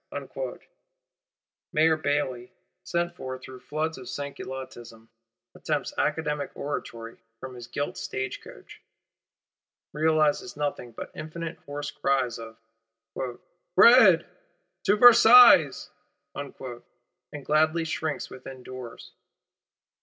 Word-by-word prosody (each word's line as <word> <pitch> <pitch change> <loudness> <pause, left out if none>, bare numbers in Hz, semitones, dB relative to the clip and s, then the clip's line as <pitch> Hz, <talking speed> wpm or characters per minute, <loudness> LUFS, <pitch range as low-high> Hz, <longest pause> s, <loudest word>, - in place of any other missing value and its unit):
Mayor 160 +1 +3
Bailly, 145 -5 -2 0.3
sent 175 0 -2
for 130 0 -6
through 130 0 -12
floods 155 +3 -4
of 125 - -11
Sansculottism, 130 -5 -8 0.5
attempts - - -3
academic 150 -2 -1
oratory 115 -5 -6 0.2
from 130 +1 -8
his 120 -1 -10
gilt 145 +3 -4
state 130 0 -4
coach; - - -14 1.1
realizes 155 +2 +1
nothing 145 -5 -3
but 115 - -9
infinite 160 +1 -7
hoarse 145 0 -5
cries 130 -4 -1
of: 115 0 -10 1.2
'Bread! 200 -5 +7 0.6
To 205 - +4
Versailles!'—and 220 - +5 0.9
gladly 155 +2 +2
shrinks 155 -1 -3
within 130 0 -10
doors. 125 -2 -10
145 Hz, 90 wpm, -26 LUFS, 130-160 Hz, 1.2 s, Bread